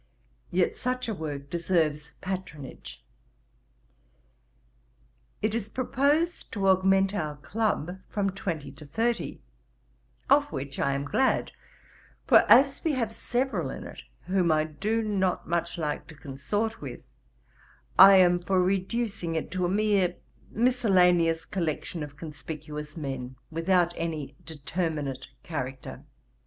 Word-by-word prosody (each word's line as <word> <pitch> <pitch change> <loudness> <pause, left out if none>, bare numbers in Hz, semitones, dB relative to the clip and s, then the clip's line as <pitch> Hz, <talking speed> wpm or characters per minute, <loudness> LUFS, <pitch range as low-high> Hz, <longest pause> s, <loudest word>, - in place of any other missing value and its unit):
Yet 180 0 +1
such 255 0 -2
a 225 - -1
work 145 -5 -6
deserves 165 -3 0
patronage. 150 - -6 2.4
'It 215 0 +1
is 220 -2 -2
proposed 285 +8 0
to 200 -3 0
augment 190 +1 +4
our 155 -7 -2
club 190 -1 -2
from 200 -2 0
twenty 170 -8 -4
to 150 +2 -13
thirty, 230 +9 -1 0.9
of 285 +1 +4
which 135 -1 -5
I 140 - +2
am 140 +1 -2
glad; 260 - +1 0.7
for - - +6
as 275 +3 +6
we 320 - +1
have 230 -4 -1
several 255 +4 -1
in - - -6
it - - -9 0.2
whom 180 -3 +2
I 155 0 +3
do 210 +9 -1
not 190 -4 0
much 170 0 -1
like 150 -3 -3
to 160 - -12
consort 185 +12 -3
with, - - -7 1.0
I 195 +1 +11
am 175 -1 +5
for 185 +2 +1
reducing 190 -1 0
it 160 - -3
to 185 0 0
a - - -2
mere 200 -3 +2 0.3
miscellaneous 180 -9 +3
collection 170 -2 -3
of 145 -1 -7
conspicuous 150 0 -7
men, 135 -4 -5 0.2
without 175 +1 +2
any 160 -4 -4
determinate 155 -3 -3 0.2
character. 135 -5 -5
180 Hz, 125 wpm, -27 LUFS, 150-210 Hz, 2.4 s, I